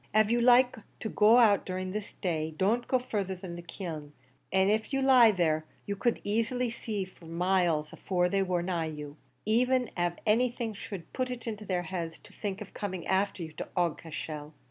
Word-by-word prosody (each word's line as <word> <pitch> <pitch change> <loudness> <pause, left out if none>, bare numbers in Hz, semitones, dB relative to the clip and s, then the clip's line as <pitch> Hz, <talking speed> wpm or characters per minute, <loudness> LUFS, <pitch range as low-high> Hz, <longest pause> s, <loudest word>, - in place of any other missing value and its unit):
Av 215 0 +5
you 240 0 +3
like 250 +1 +5 0.2
to 220 - -3
go 215 +3 +6
out 215 -5 +6
of 185 0 -3
this 210 -1 -5
during 160 -4 -1
the 160 - -8
day, - - -19
don't 225 +7 +1
go 260 - +3
further 205 -6 -2
than 180 -1 -7
the 175 - -7
kiln; 165 -4 -7 0.4
an' 190 +1 +4
av 220 +1 +1
you 270 - +1
lie 260 -4 +7
there, 160 -6 +1 0.2
you 200 - -2
could 235 +4 0
easily 230 +3 0
see 215 -4 -3
them 165 -3 -12
miles 175 -4 +2
afore 180 -2 0
they 195 +2 +1
war 180 -2 0
nigh 175 -2 -1
you, 150 -2 -7 0.3
even 250 +3 +2
av 175 -1 +1
anything 235 +1 +1
should 195 -4 -8
put 255 -1 -1
it 250 -2 -5
into 215 -2 -5
their 180 -2 -1
heads 170 -2 -4
to - - -16
think 200 -2 -4
of 205 - -9
coming 185 -4 -4
afther 190 -1 +1
you 160 - -7
to - - -6
Aughacashel." 160 -3 -3
195 Hz, 205 wpm, -30 LUFS, 175-225 Hz, 0.4 s, lie